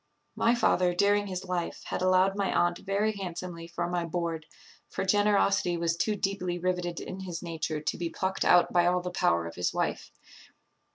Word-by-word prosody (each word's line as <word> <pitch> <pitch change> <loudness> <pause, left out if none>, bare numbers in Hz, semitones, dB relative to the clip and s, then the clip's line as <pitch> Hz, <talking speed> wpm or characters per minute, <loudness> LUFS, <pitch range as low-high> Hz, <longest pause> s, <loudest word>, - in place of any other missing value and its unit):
My 235 +1 +3
father, 180 -7 +2
during 205 +2 +3
his 185 0 -5
life, 180 -2 -3
had - - -3
allowed 185 +1 +3
my 200 -1 0
aunt 175 0 +1
very 200 +2 0
handsomely 175 -4 -6
for 170 0 -3
my 175 -1 -1
board; 165 -2 -3 0.4
for - - -3
generosity 200 -3 +2
was 165 0 0
too 210 +5 0
deeply 190 -3 -2
riveted 180 -1 -2
in 185 - -7
his 180 -3 -6
nature 160 -2 -3
to 150 - -2
be 170 -1 -2
plucked 190 +3 -2
out 175 -1 +5
by 175 -1 +4
all 180 0 +2
the 180 0 -4
power 85 - +1
of 85 - -6
his 90 - -2
wife. - - -2
180 Hz, 185 wpm, -28 LUFS, 170-195 Hz, 0.4 s, out